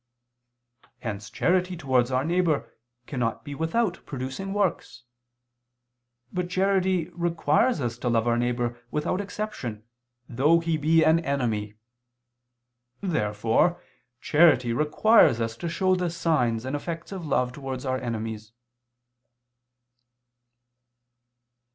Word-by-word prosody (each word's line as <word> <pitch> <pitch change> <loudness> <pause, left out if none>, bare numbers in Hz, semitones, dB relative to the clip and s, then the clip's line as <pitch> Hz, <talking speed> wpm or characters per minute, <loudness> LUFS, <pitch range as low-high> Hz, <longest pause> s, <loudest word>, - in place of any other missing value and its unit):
Hence 105 -2 -5
charity 180 0 +1
towards 130 -5 +1
our 130 +1 0
neighbor 170 -3 0 0.3
cannot 120 -3 -3
be 145 - -6
without 170 +7 -1
producing 135 +8 -5
works. 200 -10 -2 1.3
But 180 -1 -2
charity 185 -2 +1
requires 170 - +1
us 120 -3 -3
to 125 - -1
love 115 0 +1
our 120 - +3
neighbor 120 0 -1
without 150 +7 -1
exception, 200 - -5 0.4
though 145 +7 +3
he 165 -1 -1
be 160 +2 +3
an 160 +1 +4
enemy. 115 -9 -2 1.3
Therefore 115 - +1 0.4
charity 145 -7 +4
requires 150 - +4
us 115 -1 -2
to 170 - -4
show 185 +2 +1
the 180 -1 0
signs 130 -9 0
and 130 +2 -2
effects 165 +4 -5
of 185 -5 -6
love 125 -3 +1
towards 135 -1 -6
our 130 0 -1
enemies. 110 -2 -5
145 Hz, 110 wpm, -26 LUFS, 120-175 Hz, 1.3 s, an